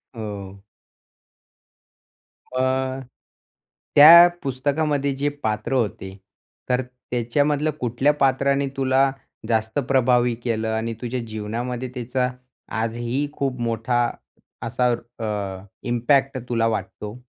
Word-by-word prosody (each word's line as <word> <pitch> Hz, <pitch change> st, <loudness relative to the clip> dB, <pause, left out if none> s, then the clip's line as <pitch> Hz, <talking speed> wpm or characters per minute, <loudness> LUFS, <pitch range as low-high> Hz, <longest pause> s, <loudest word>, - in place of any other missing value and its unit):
हो. 100 Hz, -3 st, -7 dB, 2.0 s
अ, 130 Hz, 0 st, 0 dB, 1.0 s
त्या 170 Hz, +4 st, +11 dB
पुस्तकामध्ये 140 Hz, +1 st, 0 dB
जे 145 Hz, +2 st, 0 dB
पात्र 110 Hz, +2 st, -2 dB
होते 100 Hz, -5 st, -2 dB, 0.5 s
तर 125 Hz, 0 st, +2 dB
त्याच्यामधलं 125 Hz, +4 st, -1 dB
कुठल्या 125 Hz, +4 st, +2 dB
पात्राने 140 Hz, +1 st, +2 dB
तुला 135 Hz, 0 st, +3 dB, 0.4 s
जास्त 110 Hz, +2 st, 0 dB
प्रभावी 125 Hz, -2 st, +3 dB
केलं 110 Hz, -2 st, -1 dB
आणि 115 Hz, +1 st, -2 dB
तुझ्या 125 Hz, +1 st, -2 dB
जीवनामध्ये 120 Hz, +4 st, -4 dB
त्याचा 125 Hz, +1 st, -1 dB, 0.5 s
आजही 120 Hz, +5 st, -2 dB
खूप 135 Hz, -4 st, -3 dB
मोठा 115 Hz, +1 st, 0 dB, 0.7 s
असा 125 Hz, +2 st, 0 dB, 0.3 s
अ, 100 Hz, -4 st, -4 dB, 0.2 s
इम्पॅक्ट 130 Hz, +3 st, +2 dB
तुला 115 Hz, -2 st, +1 dB
वाटतो? 105 Hz, 0 st, -4 dB
125 Hz, 95 wpm, -23 LUFS, 115-135 Hz, 2.0 s, त्या